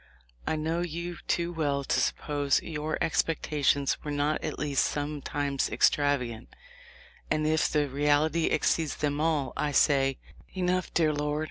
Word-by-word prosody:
I - - +1
know 160 +2 -1
you 170 0 -4
too 170 0 0
well 145 -4 0
to - - +1
suppose 145 -2 0
your 155 -1 -3
expectations 150 -3 +1
were 150 - -5
not 145 +1 0
at - - -3
least 145 -2 +1
sometimes 145 -1 -2
extravagant, 130 -6 +1 0.7
and 155 0 +1
if 155 0 +2
the 150 -1 +1
reality 150 +4 +2
exceeds 160 -3 +1
them 145 -1 -1
all, 155 -5 0
I 150 - -1
say, 135 -2 +3 0.4
'Enough, 185 0 0
dear 155 -2 +3
Lord.' 150 0 -1
150 Hz, 140 wpm, -28 LUFS, 145-160 Hz, 0.7 s, say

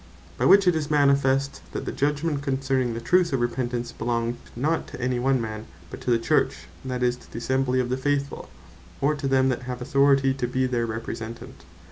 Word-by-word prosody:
By - - -1
which 195 -1 +6
it 180 - +5
is 155 -1 -2
manifest, 140 -2 +2
that - - -4
the - - -2
Judgment 145 +1 -1
concerning 130 -3 0
the - - -3
truth 175 +6 +2
of 135 - +1
Repentance, 120 0 -2
belonged 115 +1 -2 0.2
not 155 +7 0
to - - -9
any 125 0 0
one 130 +1 +2
Man, 110 -1 -5 0.2
but - - -8
to - - -4
the 120 - +4
Church, 115 -6 0 0.2
that 125 -1 -3
is, 125 0 +2
to - - -18
the - - -7
Assembly 130 +1 0
of 125 -1 -1
the 130 - 0
Faithfull, 140 +1 -2 0.5
or 145 +2 +2
to 145 -2 -3
them 130 0 +3
that 125 - -1
have 125 -1 -4
authority 135 +1 +3
to 130 -2 -2
bee 130 +1 0
their 120 -2 0
Representant. 115 +1 -7
130 Hz, 205 wpm, -25 LUFS, 120-140 Hz, 0.5 s, which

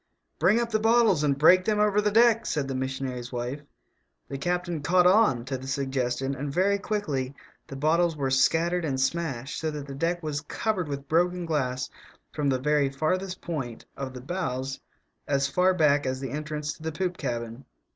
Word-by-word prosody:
" - - -49
Bring 225 - +4
up 235 -1 -2
the 215 - +2
bottles 225 -7 +4
and 140 -2 +2
break 180 +5 +6
them 210 +1 +1
over 210 0 +3
the 210 - +2
deck," 230 +1 +4
said 145 -3 -1
the 135 - -3
missionary's 130 -2 -4
wife. 125 +3 -4 0.7
The 135 - -5
captain 175 0 -2
"caught 180 +4 +3
on" 180 - +4
to 135 -1 -3
the 130 - -9
suggestion, 135 -1 -1
and 140 +1 -4
very 195 +6 +2
quickly 145 - -2 0.3
the 135 - -8
bottles 160 +3 +2
were 135 -2 -1
scattered 165 +6 +2
and 135 -4 -1
smashed, 135 -2 -2
so 160 - -1
that 150 -2 -5
the 140 - -8
deck 170 +5 -1
was 150 -2 -2
covered 180 +2 -2
with 140 -1 -5
broken 175 +3 +1
glass 130 -5 -1 0.5
from 145 -2 0
the 130 - +2
very 145 +1 +2
farthest 180 +7 -2
point 135 -9 -5
of 130 -2 -6
the 125 - -7
bows 135 -4 -3 0.5
as 140 -1 +1
far 180 +6 +3
back 145 -6 +3
as 130 0 -2
the 135 -3 -5
entrance 150 0 -3
to - - -18
the 160 0 -3
poop 180 +3 -2
cabin. 120 0 -4
150 Hz, 195 wpm, -27 LUFS, 135-180 Hz, 0.7 s, break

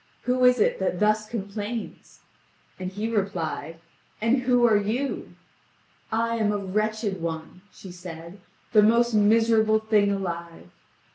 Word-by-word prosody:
Who 255 0 +1
is 250 -1 +5
it - - +2
that 185 -2 -1
thus 215 0 +1
complains?" 210 +1 -6 0.6
And 185 0 -4
he 210 +3 -3
replied: 175 -7 -3 0.4
"And 230 +4 +2
who 250 -1 +3
are 225 -2 +4
you?" 220 +7 -2 0.8
"I 230 +1 0
am 215 -2 +1
a 205 - 0
wretched 210 0 -2
one," 165 +2 -5
she 190 - -12
said, 175 +1 -10 0.3
"the 215 -3 +6
most 235 +2 +3
miserable 220 +1 +4
thing 215 -2 +2
alive." 170 - -5
210 Hz, 135 wpm, -25 LUFS, 185-225 Hz, 0.8 s, the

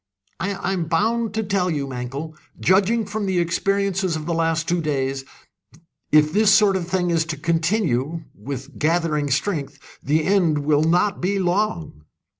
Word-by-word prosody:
"I 195 0 -2
am 175 -3 -1
bound 220 +6 0
to 220 - 0
tell 195 -3 0
you, 145 -4 -1
Mankell, 135 +4 -6 0.2
judging 205 +4 +2
from 205 0 -3
the 190 -1 0
experiences 195 +1 0
of 155 -1 -5
the 170 - -1
last 165 0 0
two 175 0 +1
days, 135 -3 -2 0.9
if 155 0 +4
this 210 +1 +4
sort 205 -2 +5
of 180 -3 -2
thing 180 -1 0
is 165 -1 +2
to 160 -2 -4
continue 165 - 0
with 135 +5 -8
gathering 155 -2 +1
strength! 145 -1 -1 0.2
the 155 +2 +1
end 170 -7 +2
will 150 0 +3
not 180 +5 +1
be 195 +3 0
long." 175 - -1
170 Hz, 160 wpm, -22 LUFS, 150-195 Hz, 0.9 s, sort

